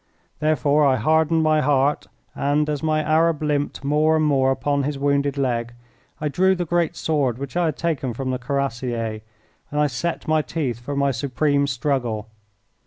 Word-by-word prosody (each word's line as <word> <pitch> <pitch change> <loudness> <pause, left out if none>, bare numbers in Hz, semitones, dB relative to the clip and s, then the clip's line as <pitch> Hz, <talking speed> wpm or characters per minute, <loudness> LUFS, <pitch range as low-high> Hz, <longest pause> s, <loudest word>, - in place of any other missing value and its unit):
Therefore 150 -1 +2
I 135 -2 +4
hardened 160 +6 +2
my 155 0 +3
heart 145 0 +1 0.3
and, 145 +2 0
as 145 - -3
my 155 -1 +1
Arab 155 0 +2
limped 145 -2 -1
more 150 +3 +2
and 155 -1 +2
more 135 -3 +3
upon 140 +2 0
his 140 +1 -2
wounded 140 0 0
leg, 120 -3 -1 0.4
I 150 - -1
drew 190 +6 +2
the 175 -1 -2
great 170 -1 0
sword 140 -7 0
which 140 +3 -7
I 175 -1 +2
had 155 -3 -1
taken 140 -8 -2
from 130 +1 -3
the 125 - -2
Cuirassier, 125 -5 -2 0.5
and 150 - -2
I 150 - +4
set 155 +6 -3
my 155 0 +3
teeth 130 -4 -3
for 140 +4 -5
my 140 0 +2
supreme 140 +3 0
struggle. 120 -5 -2
145 Hz, 175 wpm, -22 LUFS, 130-155 Hz, 0.5 s, I